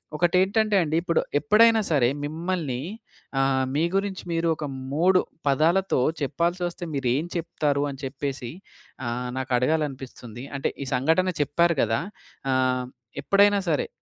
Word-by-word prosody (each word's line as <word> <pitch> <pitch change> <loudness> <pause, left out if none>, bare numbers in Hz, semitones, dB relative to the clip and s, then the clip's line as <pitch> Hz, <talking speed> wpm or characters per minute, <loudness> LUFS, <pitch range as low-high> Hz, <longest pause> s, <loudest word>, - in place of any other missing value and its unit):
ఒకటి 175 +3 +2
ఏంటంటే 210 +3 +2
అండి, 155 -1 -1
ఇప్పుడు 170 -2 +1 0.2
ఎప్పుడైనా 220 +4 +5
సరే 120 -4 +4 0.2
మిమ్మల్ని 155 -4 -3 0.6
ఆహ్, 135 -1 +2
మీ 155 - +2
గురించి 195 -1 -1
మీరు 165 0 0
ఒక 150 - -5 0.3
3 180 +5 +4 0.3
పదాలతో 165 +4 +3 0.2
చెప్పాల్సి 170 +6 0
వస్తే 175 0 -5
మీరు 135 -2 -1
ఏం 145 +5 0
చెప్తారు? 150 -4 0
అని 135 -1 -8
చెప్పేసి 135 -2 -4 0.6
ఆహ్, 125 +1 -3
నాకు 130 0 -4
అడగాలి 155 +5 +2
అనిపిస్తుంది. 125 -3 -9
అంటే 135 - -1
ఈ - - -6
సంఘటన 160 +8 +2
చెప్పారు 170 +3 +2
కదా! 115 0 +1 0.5
ఆహ్, 130 -1 +1 0.4
ఎప్పుడైనా 200 0 +4
సరే 150 - +1
155 Hz, 140 wpm, -25 LUFS, 130-180 Hz, 0.6 s, ఎప్పుడైనా